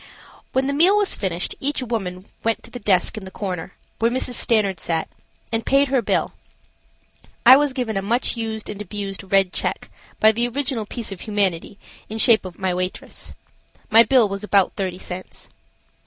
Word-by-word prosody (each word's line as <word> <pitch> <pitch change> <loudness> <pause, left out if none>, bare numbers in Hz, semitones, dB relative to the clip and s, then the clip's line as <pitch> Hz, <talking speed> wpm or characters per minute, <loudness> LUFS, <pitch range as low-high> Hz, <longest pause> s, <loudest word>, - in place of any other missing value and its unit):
When 265 +1 +1
the 280 - -1
meal 355 +8 +4
was 410 -1 +4
finished 180 -3 -2
each 280 -1 -1
woman 195 -6 -4 0.2
went 225 0 -1
to - - -13
the 245 - -7
desk 200 +1 +1
in - - -13
the 190 - -8
corner, 185 -4 -5 0.2
where 230 - +3
Mrs. 250 0 -2
Stanard 215 -5 +2
sat, 165 -1 -2 0.4
and 225 0 -1
paid 275 0 +3
her 265 -2 +2
bill. - - 0 1.1
I 255 +2 +10
was 290 0 +2
given 250 -5 -3
a 195 - 0
much 235 +7 0
used, 220 -2 -4
and 210 -1 -6
abused, 195 -1 -6
red 195 -2 +3
check, - - -3 0.3
by 220 - +6
the 235 +2 0
original 245 -3 -3
piece 230 -2 -5
of 195 - -8
humanity 200 -3 -1 0.3
in 220 - -4
shape 220 -2 +5
of 180 -2 -9
my 190 -2 -1
waitress. 185 +1 -5 0.6
My 225 +1 +9
bill 245 -2 +4
was 200 +1 -5
about 200 -3 +2
thirty 185 -2 -3
cents. 185 0 -8
215 Hz, 185 wpm, -21 LUFS, 190-245 Hz, 1.1 s, I